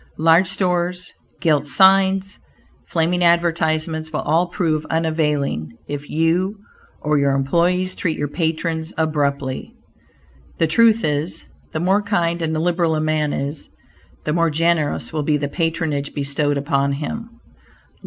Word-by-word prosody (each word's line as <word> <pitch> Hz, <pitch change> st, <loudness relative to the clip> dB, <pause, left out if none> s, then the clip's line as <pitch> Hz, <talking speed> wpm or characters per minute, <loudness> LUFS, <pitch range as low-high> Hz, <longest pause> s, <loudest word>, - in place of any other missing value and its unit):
Large 165 Hz, +3 st, +4 dB
stores, 180 Hz, -2 st, -1 dB, 0.3 s
gilt 150 Hz, -3 st, +2 dB
signs, 190 Hz, +3 st, +4 dB, 0.5 s
flaming 175 Hz, +2 st, +1 dB
advertisements, 160 Hz, -2 st, +1 dB
will 155 Hz, -, -2 dB
all 165 Hz, +4 st, +1 dB
prove 160 Hz, -4 st, -1 dB
unavailing 150 Hz, -, -1 dB
if 145 Hz, 0 st, -6 dB
you 170 Hz, +6 st, +1 dB, 0.4 s
or 150 Hz, -1 st, +1 dB
your 140 Hz, -1 st, +2 dB
employees 175 Hz, +7 st, +1 dB
treat 165 Hz, -4 st, -2 dB
your 145 Hz, -, -1 dB
patrons 160 Hz, +1 st, -2 dB
abruptly. 140 Hz, -4 st, -1 dB, 0.8 s
The 165 Hz, -, +3 dB
truth 225 Hz, +6 st, +4 dB
is, 150 Hz, +3 st, -2 dB, 0.2 s
the 155 Hz, -, -3 dB
more 190 Hz, +5 st, +2 dB
kind 175 Hz, -5 st, 0 dB
and 160 Hz, -1 st, -1 dB
liberal 170 Hz, 0 st, +1 dB
a -, -, 0 dB
man 155 Hz, -1 st, 0 dB
is, 145 Hz, +2 st, -4 dB, 0.6 s
the 150 Hz, -, 0 dB
more 170 Hz, 0 st, +2 dB
generous 160 Hz, -1 st, 0 dB
will 155 Hz, -, -1 dB
be 150 Hz, 0 st, +1 dB
the 145 Hz, 0 st, -2 dB
patronage 160 Hz, -3 st, -2 dB
bestowed 145 Hz, 0 st, 0 dB
upon 140 Hz, -1 st, 0 dB
him. 225 Hz, +11 st, -6 dB
160 Hz, 135 wpm, -20 LUFS, 150-175 Hz, 0.8 s, Large